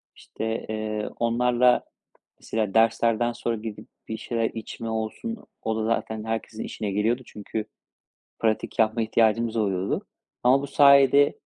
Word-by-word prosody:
İşte, 110 +1 -5
eee, 110 -1 -3
onlarla 120 +1 +3 0.6
mesela 110 -3 -2
derslerden 115 +1 +3
sonra 115 0 -2
gidip 110 -1 -7 0.2
bir 110 - -4
şeyler 115 -1 -1
içme 115 +1 -6
olsun, 110 - -3 0.2
o 110 - -1
da 110 - -1
zaten 110 -1 -1
herkesin 115 -1 -4
işine 105 -2 -4
geliyordu. 110 +5 +1
Çünkü 105 +1 -5 0.7
pratik 110 -1 -1
yapma 110 +1 +3
ihtiyacımız 115 +1 +2
oluyordu. 100 -3 -1 0.4
Ama 130 +3 +5
bu - - -3
sayede, 140 0 +5
115 Hz, 130 wpm, -25 LUFS, 110-120 Hz, 0.7 s, Ama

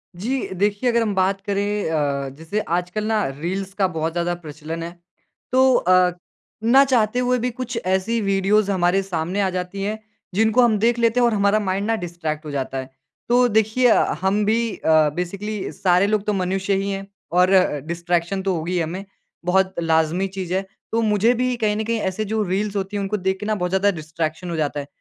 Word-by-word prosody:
जी। 245 +8 -2
देखिए 205 +5 +1
अगर 235 0 +2
हम 210 -3 0
बात 190 +1 +1
करें 205 -2 -1
अ, 140 -3 -1
जैसे 165 +7 -3
आजकल 180 +4 -2
ना 220 -1 +1
रील्स 190 +3 -3
का 195 -2 +1
बहुत 160 -2 -2
ज़्यादा 175 +1 -1
प्रचलन 160 0 -7
है। 170 - -5 0.6
तो 260 0 +5
अ, 185 -2 +4 0.5
ना 265 +4 +6
चाहते 245 -3 +2
हुए 250 0 +2
भी 250 +2 -1
कुछ 240 -1 -5
ऐसी 190 +5 +1
वीडियोज़ 195 +1 +2
हमारे 185 +1 +2
सामने 185 +1 -2
आ 190 - +1
जाती 185 +2 -4
हैं 215 +2 -2 0.4
जिनको 220 +3 +4
हम 225 -3 +4
देख 235 +2 +2
लेते 230 +1 +3
हैं 245 - +4
और 230 - +1
हमारा 200 +1 +3
माइंड 195 0 -1
ना 225 - +2
डिस्ट्रैक्ट 160 -3 -4
हो 150 - -5
जाता 135 -1 -3
है। 130 0 -5 0.4
तो 245 +1 +5
देखिए 220 +3 +2
अ, 225 - +5 0.2
हम 200 +2 +1
भी 230 +2 +1
अ, 155 -1 +3
बेसिकली 200 +4 -4
सारे 185 +1 +2
लोग 210 -1 0
तो 210 - +1
मनुष्य 190 +1 -1
ही 200 - -2
हैं 195 0 -5 0.2
और 180 +1 +4 0.4
डिस्ट्रैक्शन 170 +2 -1
तो 195 - +1
होगी 165 +3 -3
ही 180 - +1
हमें 175 +5 -3 0.4
बहुत 190 +1 +2
लाज़मी 165 +3 +1
चीज़ 185 -2 -5
है। 190 +1 0 0.3
तो 230 +1 +1
मुझे 215 +2 +3
भी 250 +1 0
कहीं 215 -2 +1
न 220 - -1
कहीं 230 0 -1
ऐसे 215 +3 -3
जो 220 +1 -1
रील्स 200 +2 -2
होती 195 +1 -3
हैं 200 - -1
उनको 205 +2 -1
देख 190 0 -1
के 210 - -5
ना 215 0 0
बहुत 180 -2 -2
ज़्यादा 195 +1 +3
डिस्ट्रैक्शन 160 +1 -4
हो 170 - -3
जाता 150 -2 -1
है। 140 - -6
195 Hz, 210 wpm, -22 LUFS, 175-215 Hz, 0.6 s, ना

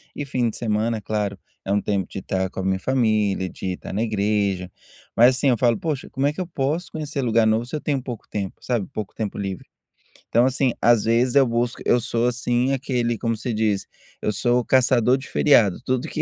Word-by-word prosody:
e 145 - -4
fim 125 -3 0
de - - -6
semana, 110 0 0
é - - -8
claro, 105 -1 -2 0.3
é 95 - -3
um 100 0 +2
tempo 100 -3 -1
de - - -6
estar 95 0 -2
com - - -8
a - - -2
minha 95 0 0
família, 110 -6 +1
de 95 0 -4
estar 90 - -8
na 105 - -1
igreja, 100 -4 0 0.5
mas, 125 +2 +6
assim, 135 +2 0
eu 120 - +3
falo: 120 -1 +2
"Poxa, 150 -5 -3
como 135 +2 0
é 145 - 0
que 170 - -5
eu 180 - -4
posso 155 +2 -2
conhecer 150 -3 -4
lugar 115 -2 +3
novo 110 +2 +2
se 135 - -6
eu 150 - -3
tenho 140 -3 -1
pouco 125 -4 -7
tempo?", 100 -3 -4
sabe, 120 -6 -1
pouco 105 -2 -5
tempo 105 -3 -4
livre. 95 -2 -4 0.6
Então, 120 +2 +4
assim, 130 0 +1
às 120 -3 +4
vezes, 120 +3 +2
eu 140 -1 +6
busco 120 0 -1
eu 120 - +4
sou, 120 0 0
assim, 120 +1 0
aquele, 125 -3 -1
como 115 0 -1
se 115 +2 -4
diz? 105 -2 0 0.4
Eu 105 - 0
sou 120 +4 +2
caçador 125 0 +3
de 135 - -9
feriado, 110 -10 +4
tudo 130 0 -1
que 155 - -3
115 Hz, 225 wpm, -23 LUFS, 105-130 Hz, 0.6 s, mas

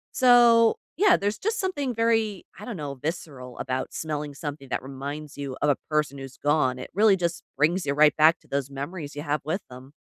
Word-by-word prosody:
So, 240 -2 +6 0.2
yeah, 390 +1 +5
there's 205 +2 -2
just 445 +3 -1
something 290 -10 -2
very, 225 -3 +1
I 210 - -8
don't 230 -4 -5
know, 145 -3 -5
visceral 135 -4 -6
about 130 0 -3
smelling 150 -2 -4
something 145 -2 -7
that - - -2
reminds 140 +2 -7
you 135 -2 -5
of 145 - +1
a - - +1
person 150 -3 0
who's 135 -1 -9
gone. 145 -4 +1
It 130 - -8
really 210 +1 +5
just 170 -2 -2 0.2
brings 170 +6 +2
you 140 - 0
right 150 0 +5
back 160 +2 +5
to - - -25
those 140 -1 -2
memories 145 +2 -6
you 145 - -5
have 150 0 -1
with 160 +7 -2
them. 130 +3 -12
150 Hz, 210 wpm, -26 LUFS, 140-205 Hz, 0.2 s, So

